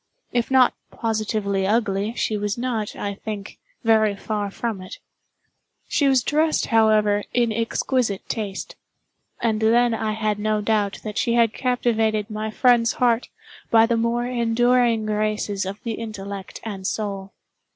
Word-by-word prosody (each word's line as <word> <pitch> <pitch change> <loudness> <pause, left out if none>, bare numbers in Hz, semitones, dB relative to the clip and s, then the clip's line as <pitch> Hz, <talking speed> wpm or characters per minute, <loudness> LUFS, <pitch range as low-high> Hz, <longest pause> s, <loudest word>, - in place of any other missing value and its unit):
If 240 -1 0
not 260 -2 +5 0.2
positively 215 -3 -1
ugly, 210 0 0
she 220 - -1
was 205 0 -2
not, 235 -4 -2
I 200 - -3
think, 205 -1 -7 0.2
very 220 -2 +3
far 205 0 -3
from 215 -1 -4
it. 185 - -9 0.9
She 285 - +2
was 265 -3 +3
dressed, 310 +3 +1
however, 215 -2 +4
in 240 -2 +3
exquisite 230 -1 -1
taste—and 215 +1 -5
then 235 +2 +4
I 220 -1 -1
had 215 -1 -1
no 215 0 0
doubt 210 -1 0
that 210 -1 -3
she 235 - +1
had 230 -2 +3
captivated 225 -4 0
my 215 +1 -3
friend's 235 0 +3
heart 240 -1 +1 0.4
by 225 -1 +6
the 235 0 +1
more 235 +1 0
enduring 240 -1 +2
graces 210 -2 -1
of 200 +2 -5
the 230 - -2
intellect 200 -3 -7
and 195 -4 -5
soul. 200 -3 -4
220 Hz, 140 wpm, -23 LUFS, 210-235 Hz, 0.9 s, by